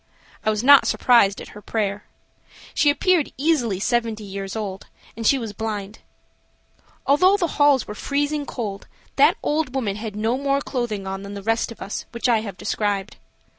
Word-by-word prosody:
I - - +1
was 215 +1 -1
not 285 +1 +7
surprised 215 -6 +4
at - - -10
her 210 - -12
prayer. 205 -2 -2 0.7
She 295 - +3
appeared 330 +1 +2
easily 260 - +1
seventy 230 -1 -1
years 195 0 -6
old, 200 -3 -5 0.3
and 225 0 -2
she 275 - +5
was 225 -5 -5
blind. 210 -1 -5 1.1
Although 365 +9 +4
the 365 - +1 0.2
halls 290 -3 +4
were 210 - -5
freezing 290 +5 -2
cold, 205 -5 -5 0.3
that - - +5
old 295 -3 -1
woman 210 -7 -1
had 215 -1 -6
no 225 +4 0
more 275 0 +1
clothing 240 -8 -3
on 195 0 -4
than 200 +1 -8
the 200 - -7
rest 225 +2 0
of 230 - -8
us, 195 - -6
which 235 +2 -1
I 235 -2 +4
have 200 -4 -7
described. 205 +1 -2
225 Hz, 175 wpm, -22 LUFS, 205-275 Hz, 1.1 s, not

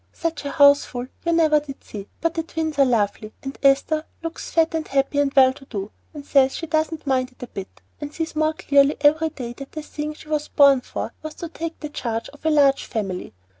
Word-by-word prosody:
Such 325 -3 -3
a - - -2
houseful 280 -4 +4 0.2
you 335 - +1
never 315 -2 +4
did 285 -2 -10
see; 200 -2 -8
but 330 0 +1
the 325 - -1
twins 315 -2 -4
are 275 - +7
lovely, 215 -3 0
and 270 0 -5
Esther 280 +3 +3 0.2
looks 330 0 -5
very 330 -1 +4
fat 330 - -20
and 320 -1 -2
happy 275 +1 +1
and 285 -1 +2
well 260 -1 +6
to 270 - -15
do, 205 -4 -5 0.2
and 295 -3 -9
says 270 -2 +3
she 330 - -4
doesn't 315 0 -1
mind 260 -2 0
it 250 - -12
a - - -6
bit, 195 -4 -9 0.2
and 290 -1 -6
sees 325 0 -4
more 310 0 +2
clearly 280 -1 +3
every 310 +2 +4
day 245 -6 -7
that 275 +2 -11
the 310 - -5
thing 300 0 -5
she 305 - -15
was 300 -1 -1
born 280 -2 +5
for - - -5
was 310 0 -7
to 340 - -6
take 330 0 -6
the 300 - -5
charge 230 -5 -4
of 290 - -18
a 320 - +2
large 280 -3 +4
family. 195 -5 -4
285 Hz, 235 wpm, -23 LUFS, 265-315 Hz, 0.2 s, are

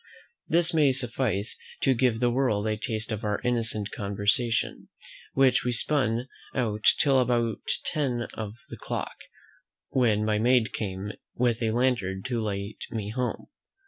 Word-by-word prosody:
This 170 +1 +3
may 150 -4 +5
suffice 120 -5 -1 0.2
to 135 - +4
give 120 -2 +2
the 120 -1 +3
world 120 -5 +1
a 110 0 +1
taste 110 +1 -3
of 110 +1 -3
our 105 -1 0
innocent 115 -4 -1
conversation, 105 +3 0 0.5
which 130 -2 +4
we 125 - 0
spun 120 -1 0 0.3
out 110 -4 -1
till 135 -2 +4
about 120 -2 +1 0.3
ten 130 -6 0
of 105 -2 -5 0.2
the - - -8
clock, - - -4 0.7
when 110 -5 +2
my 105 -1 +1
maid 120 -2 +3
came 100 -1 -3 0.2
with 120 -1 +1
a 115 - +1
lantern 110 -6 0
to 120 -3 -1
light 100 -1 -4
me 105 -3 -4
home. 125 +1 -3
115 Hz, 145 wpm, -27 LUFS, 105-125 Hz, 0.7 s, may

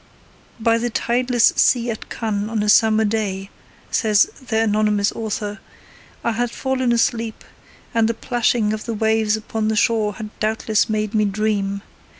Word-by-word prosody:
'By 230 0 +2
the 240 +1 -1
tideless 240 +1 +2
sea 240 -1 +3
at 220 - -8
Cannes 215 -2 -2
on 220 -2 -1
a 210 - 0
summer 220 0 +5
day,' 200 -3 -2 0.4
says 210 -3 +4 0.2
their 225 -2 +1
anonymous 210 -1 +1
author, 210 -1 -4 0.6
'I 235 - +1
had 240 +2 -1
fallen 260 0 -1
asleep, 230 -1 0 0.5
and 230 -1 +2
the 230 - -1
plashing 230 -2 0
of 215 - -5
the 230 - -3
waves 220 0 +1
upon 220 0 -3
the 220 - 0
shore 215 -1 +2
had 215 +1 -7
doubtless 215 0 0
made 215 0 -1
me 215 -1 +2
dream. 200 -1 -1
220 Hz, 160 wpm, -21 LUFS, 210-230 Hz, 0.6 s, summer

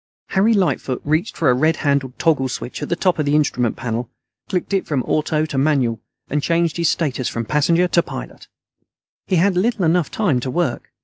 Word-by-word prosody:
Harry 210 +4 +3
Lightfoot 170 -9 0
reached 155 +8 0
for 155 -6 +3
a - - +4
red 155 +6 +2
handled 140 -3 0
toggle 145 -5 +1
switch 125 - -6
at - - -4
the 170 - +1
top 180 -1 +1
of 150 - +1
the 145 - +2
instrument 125 -6 +1
panel, 120 -1 -3 0.4
clicked 185 +1 -2
it 195 - 0
from 140 -5 0
AUTO 155 0 0
to 145 -4 -2
MANUAL, 135 -6 +1 0.3
and 150 +1 -1
changed 165 0 +1
his 170 -2 +2
status 135 -6 -1
from 115 0 -4
passenger 165 +7 +2
to 170 - +4
pilot. - - -9 0.8
He 190 - +1
had 185 +2 +3
little 205 0 +1
enough 165 -1 +2
time 185 - +1
to 130 - -4
work. 175 +5 -2
155 Hz, 200 wpm, -20 LUFS, 130-175 Hz, 0.8 s, a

